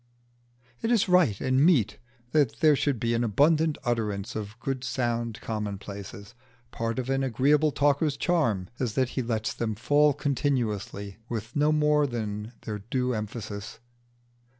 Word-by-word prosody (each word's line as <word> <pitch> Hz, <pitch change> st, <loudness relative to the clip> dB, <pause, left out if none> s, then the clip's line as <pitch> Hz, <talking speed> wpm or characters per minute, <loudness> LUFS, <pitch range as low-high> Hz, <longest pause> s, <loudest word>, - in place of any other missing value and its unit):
It 225 Hz, -, 0 dB
is 225 Hz, -5 st, +3 dB
right 180 Hz, -, +4 dB
and 130 Hz, +2 st, +2 dB
meet 150 Hz, -, +3 dB, 0.3 s
that 145 Hz, -6 st, +2 dB
there 155 Hz, -2 st, +6 dB
should 140 Hz, -3 st, 0 dB
be 115 Hz, +1 st, 0 dB
an 115 Hz, +1 st, +1 dB
abundant 150 Hz, +8 st, +3 dB
utterance 110 Hz, -2 st, -2 dB
of 105 Hz, +1 st, -6 dB
good 130 Hz, 0 st, -3 dB
sound 120 Hz, -2 st, -2 dB
commonplaces. 100 Hz, -1 st, -6 dB, 0.4 s
Part 115 Hz, 0 st, -3 dB
of 130 Hz, -1 st, -2 dB
an 135 Hz, 0 st, +1 dB
agreeable 145 Hz, +5 st, +3 dB
talker's 145 Hz, +1 st, +2 dB
charm 120 Hz, -, +1 dB
is 120 Hz, -5 st, -2 dB
that 130 Hz, -2 st, +2 dB
he 130 Hz, -, -2 dB
lets 115 Hz, -2 st, -2 dB
them 110 Hz, -2 st, -2 dB
fall 145 Hz, +6 st, +3 dB
continually 115 Hz, -9 st, -2 dB
with 115 Hz, 0 st, -5 dB
no 150 Hz, +1 st, +3 dB
more 150 Hz, -1 st, +3 dB
than 110 Hz, -2 st, -4 dB
their 105 Hz, -1 st, -5 dB
due 125 Hz, +4 st, -1 dB
emphasis. 105 Hz, -1 st, -5 dB
120 Hz, 150 wpm, -27 LUFS, 110-145 Hz, 0.4 s, there